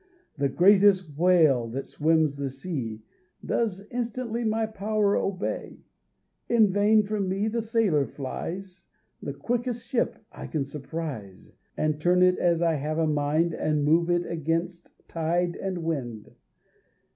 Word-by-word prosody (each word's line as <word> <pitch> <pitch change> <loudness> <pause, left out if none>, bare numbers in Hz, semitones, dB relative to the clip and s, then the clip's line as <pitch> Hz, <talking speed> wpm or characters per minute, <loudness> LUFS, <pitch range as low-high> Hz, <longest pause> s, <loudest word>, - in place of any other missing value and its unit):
The 140 -2 0
greatest 190 -1 +4
whale 155 -8 +4
that 130 +4 -5
swims 155 -1 +2
the 140 -1 -3
sea 130 -6 -5 0.4
Does 210 -5 -1
instantly 240 -1 -3
my 220 0 +1
power 215 -1 0
obey. 195 0 -3 0.7
In 220 -5 +4
vain 210 +2 +4
from 200 -2 -2
me 195 +3 0
the 230 +1 -1
sailor 215 - +1
flies, 180 +7 -7 0.3
The - - -4
quickest 240 -1 -2
ship 240 0 0
I - - -8
can 155 -3 -1
surprise, 140 - -7 0.3
And 155 -1 0
turn 180 +2 +4
it 180 0 +4
as 170 -1 +2
I 165 -1 +3
have 150 +3 -3
a 165 - +2
mind, 155 +2 +1
And 150 -2 0
move 165 +3 +3
it 175 0 +1
against 165 +2 -3 0.2
tide 170 +2 -1
and 185 -3 -4
wind. 125 -10 -4
175 Hz, 140 wpm, -26 LUFS, 150-205 Hz, 0.7 s, greatest